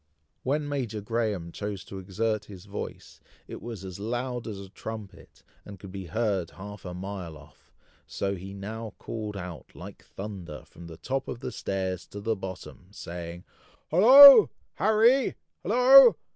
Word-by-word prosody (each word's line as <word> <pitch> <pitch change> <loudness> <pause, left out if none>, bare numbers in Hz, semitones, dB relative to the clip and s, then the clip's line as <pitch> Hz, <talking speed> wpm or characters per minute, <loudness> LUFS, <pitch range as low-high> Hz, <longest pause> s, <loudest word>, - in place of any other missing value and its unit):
When 145 +3 -1
Major 125 -7 -3
Graham 105 -5 -2
chose 100 -2 -5
to 95 - -8
exert 105 +3 -2
his 95 -2 -12
voice, 100 0 -8 0.3
it - - -9
was 110 -5 -8
as 95 0 -8
loud 120 +3 -4
as 105 -3 -6
a 100 - -9
trumpet, 110 0 -10 0.2
and 100 -2 -11
could 95 0 -11
be 95 -2 -7
heard 100 -5 -1
half 100 0 -11
a 90 0 -6
mile 90 -4 -7
off; 75 - -20 0.4
so 100 0 -3
he 95 +1 -9
now 110 +3 -7
called 105 -3 -6
out, 90 -4 -9
like - - -11
thunder, 95 -6 -8
from 85 0 -13
the 80 -1 -11
top 135 +9 -3
of 120 - -6
the - - -5
stairs 95 -2 -4
to 100 - -9
the 110 +2 -1
bottom, 95 -1 -9
saying, 85 -3 -8 0.5
"Hollo, 270 - +10 0.2
Harry! 230 +5 +3 0.3
hollo! - - +7
100 Hz, 160 wpm, -27 LUFS, 95-115 Hz, 0.5 s, Hollo